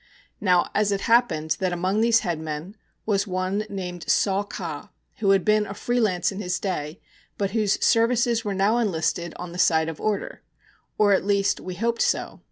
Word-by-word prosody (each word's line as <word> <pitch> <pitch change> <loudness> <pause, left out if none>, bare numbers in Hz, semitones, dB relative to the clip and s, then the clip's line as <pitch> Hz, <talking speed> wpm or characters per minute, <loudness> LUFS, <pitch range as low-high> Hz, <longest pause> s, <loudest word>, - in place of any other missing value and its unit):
Now, 180 -3 +3
it 200 -1 +1
happened 165 -10 +2
that 185 -1 0
among 185 +4 0
these 230 0 +4
headmen 160 +2 -4 0.3
was 200 -1 +1
one 185 +3 -1
named 180 -3 -6
Saw 195 -1 +2
Ka, 170 -7 -6 0.3
who 205 -3 0
had 195 -2 +3
been 210 0 +3
a 200 - -7
free 245 +4 -1
lance 185 -6 +1
in 195 +1 -6
his 180 -1 -2
day, 165 -4 -4 0.4
but 200 -2 -1
whose 210 -2 +1
services 230 0 +2
were 205 -3 -2
now 205 +5 +2
enlisted 170 -4 -1
on 180 -1 -7
the 175 - -7
side 160 -2 +3
of 160 - -8
order 215 -1 -2 0.6
or, 205 -1 +4
at 190 - +2
least, 200 0 +1
we 185 -1 -7
hoped 230 +4 -1
so. - - 0
195 Hz, 180 wpm, -24 LUFS, 180-215 Hz, 0.6 s, these